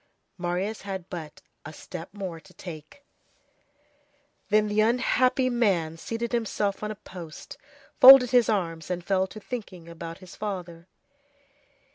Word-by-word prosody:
Marius 180 +5 -2
had 190 -2 -6
but 160 -4 -8 0.2
a 155 - -8
step 170 +2 -9
more 190 -5 -6
to - - -20
take. 165 - -10 1.5
Then 215 0 +3
the 210 +1 +2
unhappy 250 +3 +2
young 250 -2 0
man 170 -8 +1
seated 230 +7 -4
himself 215 -4 -1
on 210 - -3
a 215 - -5
post, 175 -5 -10 0.4
folded 255 -2 +10
his 245 -3 +4
arms, 165 -6 -2
and 175 -1 -3
fell 190 -1 +1
to 215 - -10
thinking 200 -7 -7
about 165 0 -8
his 185 -2 -13
father. 180 -5 -6
195 Hz, 140 wpm, -26 LUFS, 170-220 Hz, 1.5 s, folded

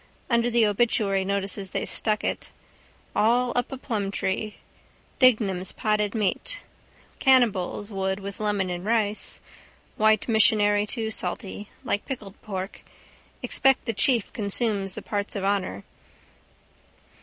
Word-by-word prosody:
Under 235 0 +3
the 235 -1 +4
obituary 205 -2 +2
notices 195 0 -1
they - - -2
stuck 215 -1 0
it. - - -3 0.7
All 240 +3 +3
up 245 +2 0
a 265 - -4
plumtree. 210 -3 -2 0.6
Dignam's 205 -8 +3
potted 210 0 0
meat. 225 - -1 0.6
Cannibals 220 -6 +2
would 190 0 -1
with 200 0 -7
lemon 205 -3 0
and 175 0 -4
rice. 215 -1 0 0.6
White 215 0 +3
missionary 210 -2 +4
too 220 0 -2
salty. 205 -1 -3
Like 205 - -2
pickled 215 -8 -7
pork. 190 -2 -5 0.6
Expect 270 -1 +2
the 230 - -1
chief 235 0 +2
consumes 200 -2 -1
the - - -7
parts 205 0 -3
of 200 - -3
honour. 195 - -1
210 Hz, 120 wpm, -25 LUFS, 195-230 Hz, 0.7 s, the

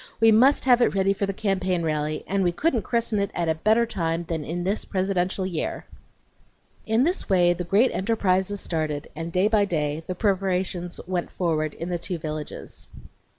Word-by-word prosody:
We 225 0 +6
must 260 +7 +5
have 245 -2 +5
it 240 - +3
ready 195 0 +3
for 200 0 -2
the - - 0
campaign 190 -3 -1
rally, 155 -1 -1
and 195 0 0
we 175 - +2
couldn't 255 - 0
christen 230 0 0
it 200 -1 0
at 170 -1 -1
a 160 - +3
better 220 +8 +2
time 170 -6 -2
than 165 -2 -3
in 175 +4 -4
this 195 +4 0
presidential 185 -1 -1
year." 175 -4 -3 1.0
II 220 - -2
In 240 - +4
this 350 +5 -1
way 175 -2 +4
the 180 - -4
great 205 +9 +3
enterprise 190 -2 +1
was 205 -1 -4
started, 155 -3 -2
and 165 +2 -5
day 185 +4 +3
by 215 -1 +3
day 155 -3 -2
the 185 - -3
preparations 185 -3 -1
went 180 -1 -2
forward 155 -4 -1
in 170 - -5
the 175 -1 -2
two 175 +1 -3
villages. 155 -1 -7
185 Hz, 195 wpm, -25 LUFS, 170-205 Hz, 1.0 s, We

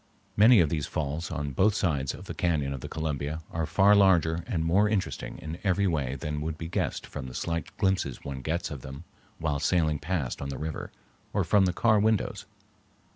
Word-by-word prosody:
Many 110 +2 +7
of 80 - +2
these 75 -1 -2
falls 75 +2 -3
on 75 -4 -3
both 100 +10 +3
sides 70 -10 0
of - - -11
the - - -6
cañon 75 -6 0
of 65 - -6
the - - -7
Columbia 80 0 -3
are 80 -1 -2
far 95 +5 +5
larger 85 -5 +4
and 85 -9 -1
more 100 +6 +3
interesting 105 -3 -2
in 80 +3 -7
every 100 0 +2
way 70 -7 0
than 75 +2 -4
would 80 0 -3
be 80 - -5
guessed 85 - -2
from 65 - -7
the 60 - -9
slight 85 -1 -2
glimpses 95 -9 0
one 70 -2 -5
gets 80 +5 -2
of 70 -3 -6
them 70 +5 -9 0.3
while 75 -3 -1
sailing 80 -1 +1
past 80 -8 -2
on 70 - -4
the 70 - -4
river, 80 0 -5 0.4
or - - +2
from 100 -2 +4
the 90 - +2
car 110 +4 +3
windows. 110 0 0
80 Hz, 205 wpm, -28 LUFS, 70-95 Hz, 0.4 s, Many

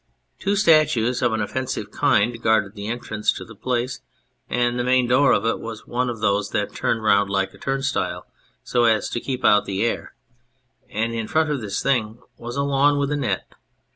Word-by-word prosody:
Two 200 +2 0
statues 155 - +3
of 125 - +2
an 110 -1 -1
offensive 130 +5 -3
kind 115 +3 +1
guarded 110 -3 +2
the 100 -1 -7
entrance 110 -2 -1
to - - -8
the 110 - -12
place, 125 +3 -2 0.5
and 120 0 0
the - - +1
main 125 0 +3
door 130 +4 +4
of 105 - +2
it 115 - 0
was 115 -1 -8
one 125 +1 -1
of 115 -3 -5
those 100 -1 +1
that 105 -1 -2
turn 115 - 0
round 100 -2 +3
like 95 -1 -1
a - - -16
turnstile 135 0 -2 0.4
so 120 -1 +1
as 110 -3 +2
to - - -2
keep 130 0 -4
out 105 - +5
the 100 +2 -2
air; 120 - -3 0.7
and 115 -1 -2
in 115 -1 -3
front 155 -1 +1
of 140 -4 -2
this 100 -2 -3
thing 115 -5 0 0.2
was 120 +1 -7
a 140 - 0
lawn 140 +1 +3
with 140 0 0
a - - +1
net. 120 -10 -2
120 Hz, 200 wpm, -22 LUFS, 110-130 Hz, 0.7 s, out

